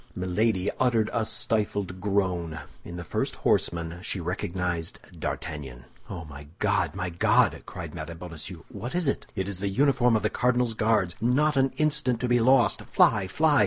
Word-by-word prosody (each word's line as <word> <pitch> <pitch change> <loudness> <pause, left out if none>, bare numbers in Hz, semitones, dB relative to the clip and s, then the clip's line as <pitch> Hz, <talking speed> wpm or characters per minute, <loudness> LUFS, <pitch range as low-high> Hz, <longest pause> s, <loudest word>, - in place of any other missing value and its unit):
Milady 95 +2 +1
uttered 115 -4 +2
a 115 -2 0
stifled 105 -4 -1
groan. 90 -5 0 0.2
In 85 - -8
the 85 - -5
first 75 - -2
horseman 85 0 0
she 95 - -3
recognized 90 -1 -2 0.2
D'Artagnan. 65 -5 -5 0.2
"Oh, 85 -4 -6
my 75 -1 -10
God, - - +1
my 90 - -3
God," 85 - +3
cried - - -7
Mme. 80 +2 -6
Bonacieux, 85 0 -7
"what 120 +8 -6
is 175 -4 +1
it?" 135 - -2
"It 95 -2 -2
is 100 -3 -3
the 100 0 -1
uniform 125 +1 +3
of 110 - +1
the 105 - +1
cardinal's 125 -1 +2
Guards. 105 -5 +1
Not 145 +6 +3
an 135 0 +3
instant 150 -6 +1
to 125 - 0
be 120 0 +3
lost! 125 0 +4
Fly, 100 -4 +3
fly!" 150 - +3
100 Hz, 170 wpm, -27 LUFS, 85-120 Hz, 0.2 s, lost